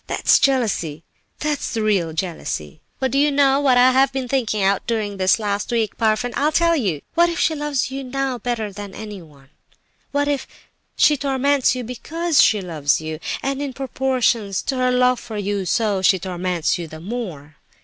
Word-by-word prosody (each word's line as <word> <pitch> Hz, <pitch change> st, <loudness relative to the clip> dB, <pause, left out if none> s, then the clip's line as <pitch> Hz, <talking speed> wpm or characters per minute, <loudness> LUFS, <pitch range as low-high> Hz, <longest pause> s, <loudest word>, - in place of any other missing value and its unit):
That's -, -, +3 dB
jealousy—that 245 Hz, -, -2 dB
is -, -, -4 dB
the 225 Hz, -2 st, -1 dB
real 195 Hz, -6 st, +1 dB
jealousy. 160 Hz, -, -4 dB, 0.2 s
"But 265 Hz, -2 st, 0 dB
do 275 Hz, -, +2 dB
you 295 Hz, +1 st, +4 dB
know 275 Hz, -1 st, +3 dB
what 265 Hz, -3 st, +3 dB
I 250 Hz, +1 st, +6 dB
have 265 Hz, +1 st, +3 dB
been 265 Hz, -2 st, -3 dB
thinking 230 Hz, -6 st, 0 dB
out 195 Hz, 0 st, +1 dB
during 215 Hz, -4 st, -2 dB
this 190 Hz, +2 st, +3 dB
last 205 Hz, -2 st, -2 dB
week, 225 Hz, -3 st, 0 dB
Parfen? 225 Hz, +2 st, 0 dB
I'll 295 Hz, +2 st, +2 dB
tell 335 Hz, +1 st, +3 dB
you. 190 Hz, -, -1 dB
What 345 Hz, +1 st, +4 dB
if 340 Hz, -, -4 dB
she 325 Hz, -, +2 dB
loves 295 Hz, -4 st, -2 dB
you 270 Hz, 0 st, -4 dB
now 265 Hz, -1 st, -2 dB
better 225 Hz, -3 st, -3 dB
than 200 Hz, 0 st, -8 dB
anyone? 165 Hz, -11 st, -10 dB, 0.2 s
And -, -, -35 dB, 0.3 s
what 285 Hz, 0 st, 0 dB
if 285 Hz, -2 st, -1 dB, 0.5 s
she 295 Hz, -, +4 dB
torments 275 Hz, -1 st, +1 dB
you 250 Hz, -, -4 dB
because 310 Hz, +7 st, 0 dB
she 210 Hz, -2 st, +4 dB
loves 155 Hz, -6 st, 0 dB
you, 155 Hz, 0 st, -6 dB, 0.2 s
and 275 Hz, +1 st, -2 dB
in 280 Hz, -2 st, -4 dB
proportion 255 Hz, -5 st, 0 dB
to 195 Hz, +8 st, -2 dB
her 255 Hz, 0 st, +2 dB
love 250 Hz, 0 st, +3 dB
for 225 Hz, -3 st, -7 dB
you, 200 Hz, -1 st, -2 dB
so 205 Hz, 0 st, +1 dB
she 190 Hz, +1 st, +4 dB
torments 180 Hz, -2 st, -2 dB
you 170 Hz, -, -5 dB
the 155 Hz, 0 st, -10 dB
more? 170 Hz, -, -6 dB
235 Hz, 190 wpm, -21 LUFS, 190-270 Hz, 0.5 s, I